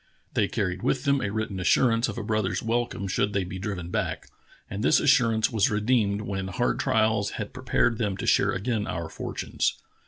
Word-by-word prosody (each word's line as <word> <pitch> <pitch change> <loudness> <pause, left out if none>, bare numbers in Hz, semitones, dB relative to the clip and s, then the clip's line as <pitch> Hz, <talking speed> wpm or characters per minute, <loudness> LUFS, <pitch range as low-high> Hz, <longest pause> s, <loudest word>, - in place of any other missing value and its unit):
They - - +2
carried 95 -2 -2
with 130 +2 0
them 140 -1 +2
a 105 - -1
written 110 -2 -3
as 90 - -1
surance 115 -2 +3
of 105 - -6
a 115 - -3
brother's 105 -4 -1
welcome 115 -3 -1
should 100 +2 0
they 100 - +1
be 95 +1 -6
driven 90 -3 -4
back; - - -2 0.4
and 100 +3 -5
this - - +5
assurance 115 -6 +3
was 110 -3 +2
redeemed 105 -1 +1
when 95 -2 -3
hard 120 +6 -1
trials 110 -2 +1
had 105 - -5
prepared 120 -2 +1
them 100 -4 -1
to - - -4
share - - +3
again 105 +1 -2
our 85 0 -4
fortunes." - - -2
105 Hz, 195 wpm, -26 LUFS, 95-115 Hz, 0.4 s, this